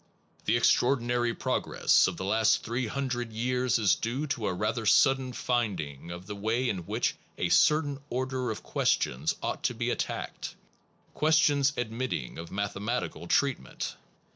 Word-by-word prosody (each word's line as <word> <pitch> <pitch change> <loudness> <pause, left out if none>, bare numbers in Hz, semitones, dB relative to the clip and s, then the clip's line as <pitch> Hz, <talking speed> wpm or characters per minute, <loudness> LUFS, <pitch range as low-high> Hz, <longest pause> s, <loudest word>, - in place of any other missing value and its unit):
The 115 - +3
ex 120 - +5
traordinary 120 -2 +1
progress - - +2
of - - -3
the 95 - -4
last 110 +2 +3
three 120 +1 -2
hundred 125 -2 -3
years 125 +3 +1
is 105 -5 +4
due 125 +6 -2
to 110 - -3
a - - 0
rather 110 +4 -1
sudden 130 +3 +4
finding 95 - -2
of 90 +1 -7
the 105 +1 -6
way 110 +5 0
in 95 -7 -3
which - - 0 0.2
a - - 0
certain 150 -2 +3
order 130 0 -2
of 110 - -5
questions 65 +5 0
ought - - -2
to - - +1
be - - -1
attacked, - - -4 0.6
questions 150 -3 +3
admitting 115 - -3
of 85 0 -7
mathe 100 0 -2
matical 95 -6 -3
treatment. 135 - 0
120 Hz, 155 wpm, -29 LUFS, 100-130 Hz, 0.6 s, ex